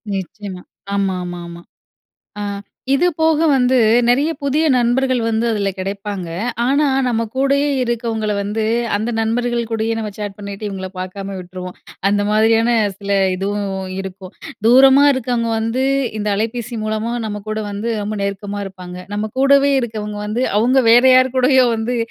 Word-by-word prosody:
நிச்சயமா. 190 0 -6 0.3
ஆமா, 195 -2 0
ஆமா, 175 0 -6
ஆமா. 170 0 -10 0.8
அ - - -3 0.5
இது 285 +6 +3
போக 320 -1 +3 0.2
வந்து 255 0 +3 0.3
நெறைய 280 +6 +3
புதிய 280 +3 +1
நண்பர்கள் 250 +1 +1
வந்து 225 0 0
அதுல 205 -3 0
கெடைப்பாங்க. 195 -1 -4 0.4
ஆனா 280 +4 +2 0.2
நம்ம 230 -2 0
கூடயே 275 +2 +2
இருக்கவங்கள 230 -3 -1
வந்து 210 +2 -2 0.3
அந்த 220 +3 -2
நண்பர்கள் 235 +1 -1
கூடயே 225 0 0
நம்ம 215 -1 -3
சேட் 205 -1 -4
பண்ணிட்டு, 200 +1 -6
இவங்கள 190 -1 -5
பாக்காம 195 +1 -6
விட்ருவோம். 180 0 -8 0.3
அந்த 205 0 +1
மாதிரியான 225 +2 +3 0.3
சில 200 0 -3 0.2
இதுவும் 195 -1 -3
இருக்கும். 190 -1 -8 0.3
தூரமா 265 +3 +7
இருக்குறவங்க 245 -3 -1
வந்து 225 +4 -1 0.3
இந்த 210 0 -2
அலைபேசி 230 +2 -3
மூலமா 215 +2 -2
நம்ம 210 -1 -5
கூட 215 0 -2
வந்து 205 +3 -3
ரொம்ப 210 +1 -3
நெருக்கமா 200 +1 -4
இருப்பாங்க. 180 -2 -9 0.2
நம்ம 215 +1 -2
கூடவே 280 +1 +5
இருக்கவங்க 210 -3 -5
வந்து 230 +5 -1
அவங்க 255 +4 +3
வேற 240 +2 +6
யார் 255 0 +4
கூடயோ 255 0 +4
வந்து 230 +3 -2
220 Hz, 145 wpm, -18 LUFS, 200-245 Hz, 0.8 s, தூரமா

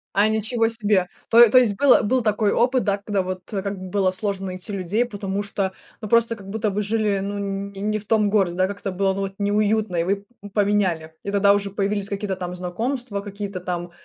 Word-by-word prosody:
А, 205 +2 +4
ничего 220 +2 +1
себе! 210 -5 +2 0.2
То 235 0 +8
то 255 - +5
есть 220 -6 +4
был 275 -2 +5
был 250 +4 +1
такой 215 -1 +1
опыт, 250 +1 +2
да, 200 -1 +1
когда, 200 -1 -1
вот, 185 0 -5
было 195 -1 -1
сложно 195 0 -3
найти 185 +3 -5
людей, 200 +5 0
потому 200 -3 -4
что, 200 -2 -2 0.3
ну, 215 - -6
просто 230 0 +3
как 195 -2 -12
будто 220 0 -1
вы 200 +2 -1
жили, 210 -1 0
ну, 200 +1 -4
не 200 0 -4
не 215 +1 -1
в 205 - -13
том 215 -1 +2
городе, 195 -4 +1
да, 185 +1 +2
как-то 200 0 -5
было, 190 +1 +1
ну, 195 - -3
вот 195 0 -4
неуютно, 210 -1 +1
и 165 - +2
вы 190 +3 +1 0.3
п 205 - -9
поменяли. 195 -6 +1
И 200 - -3
тогда 200 0 +4
уже 200 0 -1
появились 200 0 -1
какие-то 200 -1 -3
там 180 -1 -5
знакомства, 210 +5 -3
какие-то 200 -2 -6
там, 175 -1 -4
200 Hz, 215 wpm, -22 LUFS, 195-215 Hz, 0.3 s, То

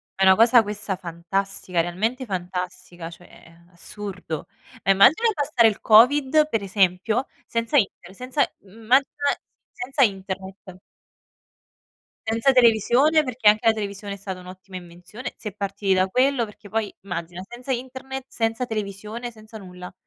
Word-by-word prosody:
È 195 - 0
una 190 0 +7
cosa 235 +2 +6
questa 210 -2 -3
fantastica, 180 +1 -3
realmente 220 +10 -2
fantastica, 180 -3 -5
cioè 170 -1 -16 0.2
assurdo. 180 -3 -6 0.4
Immagina 260 - +5
passare 280 - +3
il 215 - -6
covid, 285 +7 +5
per 225 - 0
esempio, 195 +5 +1 0.2
senza 230 +5 0
Internet, 190 -4 -1
senza 255 +3 -1
mhmm, 190 - -20
immagina 260 +5 +4 0.7
senza 270 +3 -3
Internet 190 -2 -4 1.5
senza 225 +4 +2
televisione. 250 +6 +4
Perché 255 -5 +2
anche 215 +2 +3
la 225 - +7
televisione 200 -1 -5
è - - -9
stata 190 -2 -7
un'ottima 185 +1 -11
invenzione, 180 +7 -9
si 215 - -6
è - - -8
partiti 200 -1 -2
da 185 0 +3
quello. 255 +4 +2
Perché 210 0 -14
poi 220 -1 -2
immagina, 175 -1 -6
senza 245 +3 -10
internet, 260 +1 -5
senza 225 +1 -1
televisione, 215 +2 -5
senza 220 -1 -13
nulla. 180 -2 -10
210 Hz, 140 wpm, -23 LUFS, 190-240 Hz, 1.5 s, una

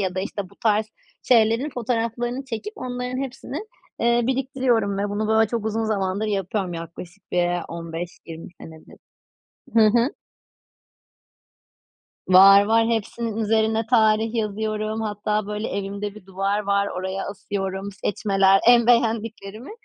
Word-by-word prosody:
ya 185 -2 -1
da, 185 - -1
işte, 200 +1 -4
bu - - -19
tarz 215 -1 +2 0.4
şeylerin 230 +4 +3
fotoğraflarını 240 +1 -2
çekip 260 - -5
onların 250 +1 -4
hepsini, 265 +1 -7 0.4
eee, 235 +1 +3
biriktiriyorum 255 -6 0
ve 205 - -1
bunu, 210 +1 -2
böyle, 220 -1 +3
çok 230 -2 -3
uzun 220 +1 -1
zamandır 200 -1 -1
yapıyorum 195 -2 -2
yaklaşık 170 +3 -10
bir 175 -1 +2 0.2
15-20 165 +1 -7
senedir. 160 -1 -13 0.8
Hı 225 -1 +6
hı. 240 +4 +2 2.2
Var, 195 +2 +8
var. 225 +2 +3
hepsinin 225 0 -2
üzerine 220 0 +1
tarih 220 -2 +3
yazıyorum. 215 0 -2
Hatta, 210 -1 -2
böyle, 210 +1 -3
evimde 200 +1 -4
bir 215 - -13
duvar 195 +2 -1
var 200 -1 +1
oraya 190 +1 -3
asıyorum 195 -1 -4
seçmeler, 195 -1 +2
en 240 -1 +6
beğendiklerimi. 225 - 0
215 Hz, 125 wpm, -23 LUFS, 195-230 Hz, 2.2 s, Var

